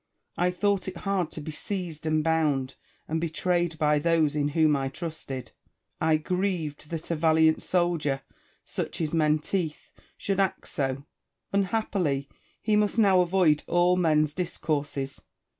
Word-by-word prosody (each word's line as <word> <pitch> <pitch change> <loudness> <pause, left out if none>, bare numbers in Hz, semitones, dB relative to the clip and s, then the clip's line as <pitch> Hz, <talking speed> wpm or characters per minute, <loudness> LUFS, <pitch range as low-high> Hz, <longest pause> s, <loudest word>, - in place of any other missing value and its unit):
I 180 +1 +2
thought 195 +1 0
it 185 -2 -5
hard 190 -3 -1
to 155 - -6
be 155 - -6
seized 170 -2 -5
and 155 0 +2
bound 150 -5 +1 0.3
and 160 +1 -1
betrayed 170 0 0
by 150 -2 +3
those 160 -2 +2
in 145 -1 +1
whom 155 -2 +5
I 135 -1 -1
trusted. 135 -4 -6 0.5
I 160 -1 +4
grieved 165 -3 -2
that 165 0 -5
a - - +1
valiant 160 0 +4
soldier 165 -6 0 0.4
(such - - -4
is 160 -2 -1
Menteith) 155 +1 0 0.3
should 195 -1 -1
act 195 -2 0
so. 135 0 -2 0.5
Unhappily! 190 -8 0 0.4
he 215 -1 +2
must 210 +1 +2
now 195 -4 +5
avoid 175 -4 +3
all 175 +1 +3
men's 155 -4 +2
discourses. 145 -5 -3
160 Hz, 140 wpm, -27 LUFS, 150-180 Hz, 0.5 s, whom